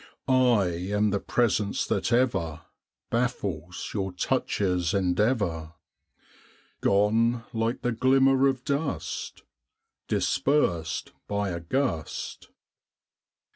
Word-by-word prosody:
I 125 Hz, -5 st, +4 dB, 0.3 s
am 105 Hz, 0 st, +2 dB
the 100 Hz, -, 0 dB
presence 105 Hz, -4 st, 0 dB
that -, -, -1 dB
ever 95 Hz, -11 st, +1 dB, 0.5 s
Baffles 100 Hz, -, -2 dB
your 95 Hz, -2 st, -2 dB
touch's 90 Hz, 0 st, 0 dB
endeavor, 90 Hz, -4 st, 0 dB, 1.1 s
Gone 115 Hz, +4 st, +2 dB
like 115 Hz, +1 st, -1 dB
the 125 Hz, -, +1 dB
glimmer 135 Hz, +3 st, +4 dB
of 130 Hz, -2 st, -1 dB
dust 140 Hz, +2 st, -3 dB, 0.6 s
Dispersed 85 Hz, -, 0 dB, 0.2 s
by 100 Hz, -1 st, -1 dB
a 85 Hz, -1 st, -3 dB
gust. 85 Hz, -, -3 dB
105 Hz, 90 wpm, -27 LUFS, 90-125 Hz, 1.1 s, I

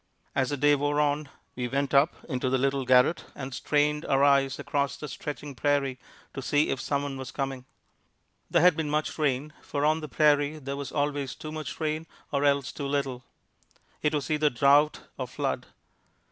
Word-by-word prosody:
As 130 Hz, -2 st, +1 dB
the 145 Hz, -, -2 dB
day 145 Hz, +2 st, +4 dB
wore 145 Hz, +1 st, +1 dB
on 145 Hz, 0 st, +1 dB, 0.3 s
we 125 Hz, -1 st, -2 dB
went 140 Hz, +2 st, -1 dB
up 140 Hz, +4 st, +3 dB
into 130 Hz, -3 st, -1 dB
the 130 Hz, -, +2 dB
little 135 Hz, 0 st, 0 dB
garret 130 Hz, +6 st, +4 dB
and 135 Hz, 0 st, -6 dB
strained 150 Hz, +3 st, +1 dB
our 135 Hz, 0 st, +3 dB
eyes 140 Hz, -2 st, +4 dB
across 140 Hz, -1 st, -1 dB
the 150 Hz, -, -6 dB
stretching 145 Hz, -1 st, -6 dB
prairie 135 Hz, 0 st, 0 dB, 0.3 s
to 135 Hz, -, -5 dB
see 145 Hz, +4 st, +2 dB
if 135 Hz, -, -1 dB
some 140 Hz, -1 st, -1 dB
one 140 Hz, -1 st, -4 dB
was 130 Hz, -, -6 dB
coming. 135 Hz, -2 st, -4 dB, 0.8 s
There -, -, +3 dB
had 180 Hz, -2 st, +6 dB
been 155 Hz, -2 st, -2 dB
much 150 Hz, +1 st, -1 dB
rain, 145 Hz, 0 st, 0 dB
for 145 Hz, 0 st, -2 dB
on 155 Hz, +1 st, +3 dB
the 155 Hz, -2 st, -7 dB
prairie 150 Hz, 0 st, +3 dB
there 140 Hz, -2 st, -5 dB
was 140 Hz, -1 st, -5 dB
always 145 Hz, -2 st, -1 dB
too 155 Hz, -, -8 dB
much 155 Hz, -2 st, -6 dB
rain 155 Hz, 0 st, -2 dB, 0.2 s
or 140 Hz, 0 st, 0 dB
else 140 Hz, -2 st, +2 dB
too 140 Hz, -, -5 dB
little. 135 Hz, -3 st, -2 dB, 0.8 s
It 150 Hz, 0 st, +1 dB
was 145 Hz, +1 st, -2 dB
either 150 Hz, 0 st, +3 dB
drought 140 Hz, +4 st, +4 dB, 0.2 s
or -, -, -2 dB
flood. -, -, -3 dB
145 Hz, 190 wpm, -27 LUFS, 135-150 Hz, 0.8 s, had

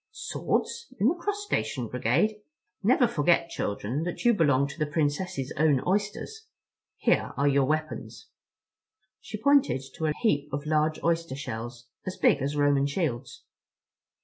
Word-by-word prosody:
"Swords? 465 Hz, 0 st, -2 dB
In 215 Hz, -, +4 dB
the -, -, +2 dB
Crustacean 410 Hz, +3 st, -2 dB
Brigade? 215 Hz, 0 st, +1 dB, 0.4 s
Never 245 Hz, +5 st, +4 dB
forget, 170 Hz, -3 st, +2 dB
children, 105 Hz, +7 st, -2 dB
that 175 Hz, +7 st, -4 dB
you 240 Hz, -, +6 dB
belong 140 Hz, -, +3 dB
to 140 Hz, -, -10 dB
the 155 Hz, -, +1 dB
Princess's 150 Hz, -1 st, -1 dB
Own 150 Hz, -2 st, +4 dB
Oysters. 210 Hz, -, -2 dB, 0.5 s
Here -, -, +1 dB
are 140 Hz, -, +2 dB
your 140 Hz, -1 st, +3 dB
weapons." 155 Hz, -3 st, -3 dB, 0.9 s
She 215 Hz, -, -7 dB
pointed 250 Hz, -, +3 dB
to 160 Hz, -2 st, -1 dB
a 150 Hz, -, +1 dB
heap 145 Hz, -9 st, +1 dB
of 145 Hz, +2 st, -3 dB
large 155 Hz, 0 st, +1 dB
oyster 165 Hz, -4 st, 0 dB
shells, 120 Hz, -2 st, -6 dB, 0.2 s
as 185 Hz, -, -4 dB
big 140 Hz, -, +3 dB
as 140 Hz, +2 st, -1 dB
Roman 145 Hz, -1 st, +3 dB
shields. 140 Hz, -5 st, -3 dB
155 Hz, 145 wpm, -27 LUFS, 140-205 Hz, 0.9 s, you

